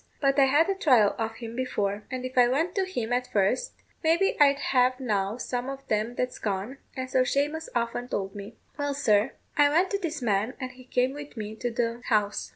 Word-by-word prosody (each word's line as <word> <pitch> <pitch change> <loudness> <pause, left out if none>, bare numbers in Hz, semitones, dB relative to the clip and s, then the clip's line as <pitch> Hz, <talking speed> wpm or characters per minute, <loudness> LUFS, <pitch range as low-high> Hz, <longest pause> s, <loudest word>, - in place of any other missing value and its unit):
But 275 0 +2
I 275 - +7
had 290 +5 +4
a 390 - +2
trial 255 - +4
of 225 0 -2
him 230 0 -7
before; 210 -5 -2
and 255 -1 -4
if 255 - -6
I 245 -1 +6
went 320 +8 0
to 390 -2 0
him 245 -11 -3
at 250 0 0
first, 205 - +1 0.3
maybe 335 +5 +3
I'd 280 -1 +6
have 255 -2 +2
now 210 -4 -1
some 250 0 -3
of 275 0 -7
them 215 +3 0
that's 250 0 -2
gone, 205 +6 -3 0.2
and 260 0 -3
so 255 0 +2
Shamous 295 +5 -1
often 235 +1 -1
told 195 -5 -3
me. 205 +2 -9 0.2
Well, 285 -1 -1
sir, 215 -3 +2 0.2
I 290 -1 +6
went 345 +6 +2
to 400 - 0
this 335 -5 -3
man, 220 0 0
and 255 -2 -4
he 255 0 -15
came 255 +1 +1
with 290 -3 -9
me 215 0 -5
to 245 +1 -2
the 235 0 -2
house. 210 -2 0
250 Hz, 220 wpm, -27 LUFS, 225-280 Hz, 0.3 s, I